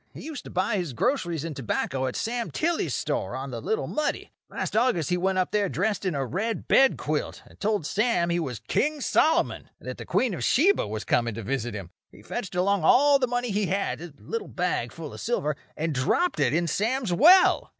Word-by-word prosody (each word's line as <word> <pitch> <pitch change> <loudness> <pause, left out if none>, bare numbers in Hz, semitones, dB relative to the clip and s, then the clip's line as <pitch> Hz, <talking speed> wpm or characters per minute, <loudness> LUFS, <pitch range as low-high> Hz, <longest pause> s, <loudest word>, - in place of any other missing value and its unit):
He - - -8
used 310 -4 -7
to - - -8
buy 195 +4 0
his 175 -8 -3
groceries 170 - 0
and 160 -3 -5
tobacco 130 +1 -2
at 125 - -4
Sam 235 0 -2
Tilly's 335 +1 -1
store, - - -2
on - - -5
the - - -5
Little 440 +3 -1
Muddy. 305 - -2 0.2
Last - - -4
August 220 - +2
he - - +3
went 190 +1 0
up 185 - 0
there 205 -2 +1
dressed 205 +3 -1
in 180 -5 0
a 135 -1 -1
red 215 - -3
bedquilt, 155 - +2
and - - -19
told 205 -5 0
Sam 200 -3 +1
he 170 - +1
was 130 -9 -4
King 300 +1 +1
Solomon, 325 +6 +1
and - - -13
that - - -5
the - - -7
Queen 250 -5 +1
of 145 -9 -4
Sheba 335 - +3
was 110 +1 -4
coming 115 -2 0
to 115 - -6
visit 120 -1 -2
him. 95 -5 -7 0.2
He - - -16
fetched 185 - -5
along 190 0 +1
all 280 - +5
the 255 - +1
money 245 -1 -1
he 200 -1 0
had—a 175 -5 -2
little 455 -2 -5
bag 180 -10 -2
full 160 -3 -8
of - - -9
silver—and 155 -6 -2
dropped 145 - +1
it - - +3
in 170 +3 +1
Sam's 220 - 0
well. 365 - +6
190 Hz, 210 wpm, -26 LUFS, 150-245 Hz, 0.2 s, well